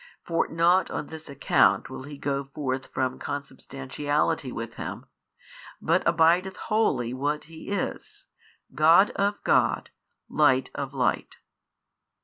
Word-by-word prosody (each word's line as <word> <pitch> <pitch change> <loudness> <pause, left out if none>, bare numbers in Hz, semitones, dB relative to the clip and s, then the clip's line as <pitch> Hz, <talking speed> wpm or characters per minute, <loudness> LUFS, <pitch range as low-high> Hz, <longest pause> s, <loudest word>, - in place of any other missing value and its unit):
For 165 -1 0
not 170 +3 +3
on - - -4
this 160 0 -10
account 140 - +3
will - - -8
He 145 0 -9
go 140 0 -2
forth 135 -1 -4
from 130 -1 -2
Consubstantiality 140 +1 -2
with 115 -1 -6
Him, - - -6 0.7
but - - +2
abideth 175 +4 +3
wholly 130 - 0
what 145 +3 -1
He 160 +3 -11
is, 200 -2 -4 0.5
God 165 +6 +6
of 200 +1 0
God, - - +2 0.4
Light 130 -4 +2
of 140 0 -5
Light. 130 - -1
145 Hz, 125 wpm, -26 LUFS, 135-165 Hz, 0.7 s, God